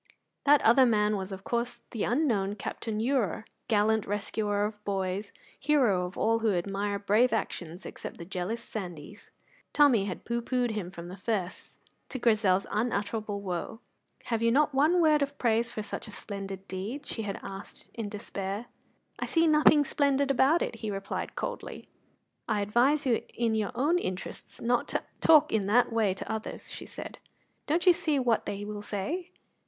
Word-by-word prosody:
That 290 0 +6
other 250 +3 +6
man 210 -2 +3
was, 190 0 -4
of 190 0 -7
course, 240 +2 -2
the 225 - -1
unknown 225 -7 +1
Captain 215 +1 -4
Ure, 230 -4 0 0.2
gallant 220 -1 +2
rescuer 205 0 -1
of 210 0 -6
boys, 195 0 -2 0.3
hero 245 -11 +3
of 180 - -11
all 225 +1 +2
who 220 -4 +2
admire 200 +3 -1
brave 210 +5 +3
actions 175 -5 -3
except - - -7
the 170 - -8
jealous 190 +6 -3
Sandys. 180 -1 -8 0.4
Tommy 265 -9 +5
had 185 -3 -5
pooh 235 0 -1
poohed 245 0 0
him 210 -5 -3
from 170 -2 -9
the 180 - -7
first, 190 -3 -3 0.3
to 265 - -4
Grizel's 210 -6 +3
unutterable 210 -1 -1
woe. 185 +3 -4 0.4
"Have 230 -2 -1
you 230 0 +3
not 295 +3 +3
one 310 +6 +4
word 305 -2 +4
of 280 0 -2
praise 230 -1 +2
for 215 - -4
such 215 - -6
a - - -9
splendid 195 -2 -7
deed?" 210 +10 -5
she 225 - -4
had 200 -2 -4
asked 195 +1 -9
in 225 -3 -4
despair. 200 +1 -4 0.5
"I - - -2
see 330 0 +3
nothing 300 -1 +5
splendid 280 -1 +2
about 275 +5 +4
it," 230 - -4
he 220 -1 -4
replied 195 -1 -4
coldly. - - -5 0.6
"I 210 -2 +1
advise 245 +9 +2
you 240 -4 +2
in 235 -2 +1
your 215 -2 0
own 300 +8 +2
interests 185 - -5
not 240 +1 +1
to - - -2 0.2
talk 310 -1 +6
in 205 -3 +1
that 235 +3 +3
way 215 -5 +2
to 195 - -6
others," 220 0 -5
she - - -8
said. - - -8 0.5
"Don't 335 +5 +1
you 360 - +8
see 310 -3 0
what 245 -4 +1
they 205 0 -3
will 210 0 -5
say?" 290 - -3
220 Hz, 175 wpm, -29 LUFS, 200-255 Hz, 0.6 s, you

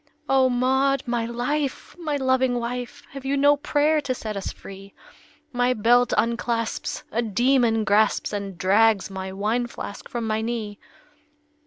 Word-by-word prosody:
"O 265 -1 +4
Maud, 265 +2 +2
my 240 -2 -1
life! 260 +4 -3
my 310 -4 -2
loving 260 -2 +1
wife! 245 +1 -5
Have 275 -1 -8
you 275 +1 0
no 285 +1 +5
prayer 295 +2 +1
to 255 -3 -2
set 215 -3 -5
us 195 - -4
free? 195 0 -12 0.6
My 245 +1 +2
belt 240 +3 +3
unclasps, 230 0 -1
a 235 - 0
demon 235 0 +2
grasps 210 +1 +2
And 200 -3 -4
drags 205 +2 +3
my 190 0 -5
wine 215 +5 -1
flask 205 -3 -8
from 235 -2 -3
my 220 0 -1
knee!" 220 -3 -4
240 Hz, 150 wpm, -24 LUFS, 215-260 Hz, 0.6 s, no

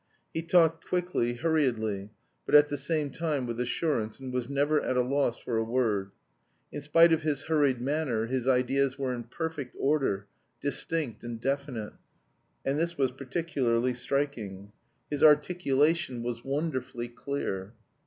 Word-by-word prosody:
He 165 - -1
talked 165 -1 +3
quickly, 175 -10 0
hurriedly, 120 -10 0 0.4
but - - +3
at 150 0 +8
the 145 - -2
same 145 +1 -1
time 155 -6 -1
with 120 -1 -4
assurance, 125 -3 -1
and 130 -1 -6
was 125 0 -2
never 145 +2 +2
at 130 - -1
a 125 - +4
loss 130 -2 +1
for 115 - -3
a 110 - +2
word. 110 -5 0 0.6
In 145 - -5
spite 165 +3 +6
of 160 - +2
his 150 -3 -1
hurried 145 -6 +2
manner 130 -4 0
his 130 +1 -2
ideas 130 +1 +2
were 135 -2 -1
in 120 -1 -5
perfect 150 0 -5
order, 135 -9 +1 0.3
distinct 145 -3 -3
and 120 -1 -5
definite 135 -4 -2 0.7
and 135 +2 +1
this 170 +1 -1
was 135 -2 +2
particularly 130 -3 0
striking. 120 -7 -3 0.4
His 145 - -2
articulation 150 -3 +3
was 120 -1 -4
wonderfully 135 -4 -2
clear. 120 -6 -4
135 Hz, 150 wpm, -29 LUFS, 120-150 Hz, 0.7 s, at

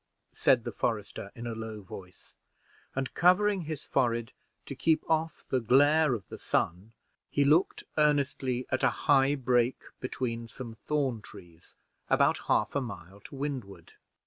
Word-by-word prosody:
said 120 -3 +3
the - - -4
forester, 105 -3 -3
in 120 -1 -7
a 120 - -3
low 110 -1 -6
voice; 90 -1 -12 0.6
and, 135 -1 -2
covering 185 +1 +3
his 155 -2 -5
forehead 120 -3 0 0.3
to - - -6
keep 160 -1 +1
off 160 0 -1
the 130 - +2
glare 145 +4 +4
of 100 -6 -8
the - - -8
sun, 95 +6 -1 0.4
he 145 - +2
looked 155 +6 +3 0.2
earnestly 140 -4 +1
at 130 - 0
a - - +4 0.2
high 140 -1 +5
brake 125 -2 +1 0.2
between 115 -2 -3
some 115 0 -8
thorn 130 -1 -1
trees, 85 -4 -13 0.3
about - - +3
a - - -13
half - - +1
a 140 - 0
mile 100 -5 -8
to - - -13
the - - -10
windward. 125 - -5
130 Hz, 160 wpm, -29 LUFS, 110-145 Hz, 0.6 s, high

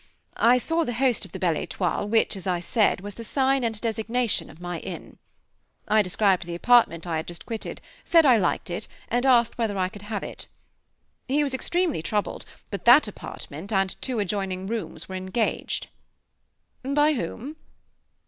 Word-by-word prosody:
I 240 +2 +5
saw 325 +6 0
the 245 -6 -3
host 250 -4 +2
of 190 - -14
the - - -6
Belle 175 -3 +1
Étoile 180 +5 -2
which, 220 -1 +2
as 195 0 -7
I 180 -2 +1
said, 200 +2 +1
was 205 +1 -6
the 230 - -8
sign 270 +2 +1
and 225 -2 -1
designation 230 0 -1
of - - -15
my 175 -1 -4
inn. - - -8 0.7
I 215 0 +5
described 190 -2 +1
the 170 - -4
apartment 180 -5 +4
I 165 -2 -1
had 160 - -4
just 170 -1 -8
quitted, 225 -2 -5 0.2
said 330 -2 +5
I 250 -4 +7
liked 180 -2 0
it, 190 +5 -4 0.2
and 245 +3 +1
asked 240 -2 +4
whether 215 -4 0
I 185 -1 +1
could 205 0 -11
have 205 0 -4
it. - - -8 0.8
He 290 +3 +2
was 275 -2 -1
extremely 340 - 0
troubled, 205 +5 -2 0.3
but 200 - -5
that 245 +2 +8
apartment 190 -2 -8
and 195 -2 +1
two 255 -3 -2
adjoining 195 -2 -2
rooms 205 -6 -4
were 190 - -8
engaged. 190 +4 -2 1.0
"By 295 +3 +3
whom?" 255 - -5
215 Hz, 175 wpm, -25 LUFS, 185-245 Hz, 1.0 s, that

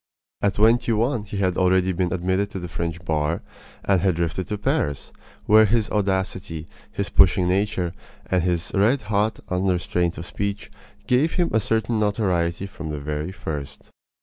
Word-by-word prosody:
At 100 -1 +1
twenty 115 +3 +4
one 115 0 0
he 105 -1 -6
had 95 -2 0
already 95 0 +3
been 90 0 -1
admitted 95 +2 0
to 100 - -6
the 90 - -6
French 85 0 -4
bar, 80 0 0 0.4
and 95 -3 +3
had 95 -2 +2
drifted 85 +2 -2
to 105 - -3
Paris, 75 -8 -1 0.3
where 110 +1 +7
his 110 0 +1
audacity, 95 -5 -1 0.2
his 100 - -3
pushing 95 -1 +5
nature, 95 -2 0 0.3
and 90 -1 +1
his 90 +1 -1
red 110 +6 +3
hot 105 +1 0
un 90 +1 0
restraint 90 -1 0
of 85 - -6
speech 100 +2 -4 0.3
gave 130 +8 +2
him 175 -2 +1
a 110 - +4
certain 110 +1 0
notoriety 95 -4 0
from 85 -5 -7
the 75 -1 -3
very 75 +4 -3
first. 75 -6 -7
95 Hz, 170 wpm, -23 LUFS, 85-105 Hz, 0.4 s, where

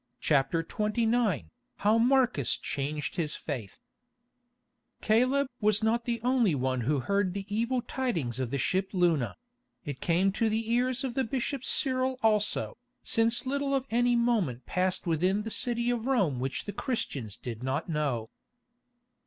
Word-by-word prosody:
CHAPTER 150 +2 +2
XXIX 215 - 0 0.3
HOW 215 +3 +2
MARCUS 245 - +3
CHANGED 145 +1 -4
HIS 155 -3 0
FAITH 120 - -6 1.2
Caleb 255 +6 +3
was 215 0 +2
not 230 +2 +1
the 235 -1 -1
only 245 - +3
one 130 -1 -1
who 140 +3 0
heard 200 +4 0
the 200 -1 -4
evil 235 +2 0
tidings 170 - -2
of 130 -3 -1
the 140 - -2
ship 190 +8 0
Luna; 170 -9 +1 0.5
it 145 -3 -6
came 180 +3 +2
to 225 +3 +1
the 220 +1 -1
ears 250 +2 +1
of 260 -3 -2
the 265 - 0
bishop 260 +2 -2
Cyril 260 -1 +1
also, 215 +1 +2 0.2
since 230 +2 +2
little 275 +1 0
of 265 -1 -1
any 245 +1 +3
moment 220 - +1
passed 185 +1 -1
within 180 +5 +1
the 225 - -5
city 240 +1 0
of 240 0 -2
Rome 195 - +1
which 130 +1 -3
the 205 - -5
Christians 140 - -3
did 115 -2 -7
not 130 +6 -2
know. 140 -9 -2
210 Hz, 155 wpm, -29 LUFS, 150-240 Hz, 1.2 s, MARCUS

